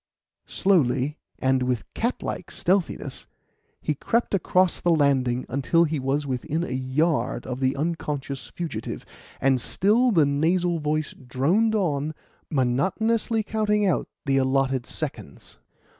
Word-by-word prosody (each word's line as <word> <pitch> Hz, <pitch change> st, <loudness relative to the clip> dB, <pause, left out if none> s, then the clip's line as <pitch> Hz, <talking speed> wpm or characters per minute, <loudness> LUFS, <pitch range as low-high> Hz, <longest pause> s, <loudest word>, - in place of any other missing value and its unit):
Slowly 150 Hz, -6 st, +1 dB, 0.2 s
and 130 Hz, 0 st, +2 dB
with 125 Hz, -2 st, 0 dB
cat 235 Hz, +2 st, -2 dB
like -, -, -4 dB
stealthiness, 185 Hz, -1 st, -1 dB, 0.5 s
he 150 Hz, -, 0 dB
crept 230 Hz, -, 0 dB
across 185 Hz, -1 st, +2 dB
the 175 Hz, -, +1 dB
landing 135 Hz, -6 st, +2 dB
until 140 Hz, +5 st, +2 dB
he 155 Hz, -2 st, -1 dB
was 135 Hz, +3 st, 0 dB
within 140 Hz, +5 st, -2 dB
a -, -, -4 dB
yard 130 Hz, -1 st, 0 dB
of 125 Hz, 0 st, -4 dB
the 130 Hz, 0 st, +1 dB
unconscious 145 Hz, -3 st, -3 dB
fugitive, 155 Hz, -11 st, -5 dB, 0.3 s
and 135 Hz, -2 st, +2 dB
still 220 Hz, -, +3 dB
the 165 Hz, -10 st, +4 dB
nasal 170 Hz, +4 st, +1 dB
voice 155 Hz, 0 st, -1 dB
droned 160 Hz, -, +1 dB
on, 155 Hz, -6 st, 0 dB, 0.3 s
monotonously 195 Hz, -, +1 dB
counting 210 Hz, -1 st, +1 dB
out 185 Hz, -, +1 dB, 0.2 s
the 135 Hz, -1 st, +2 dB
allotted 135 Hz, -1 st, +1 dB
seconds. -, -, -6 dB
150 Hz, 130 wpm, -25 LUFS, 130-180 Hz, 0.5 s, the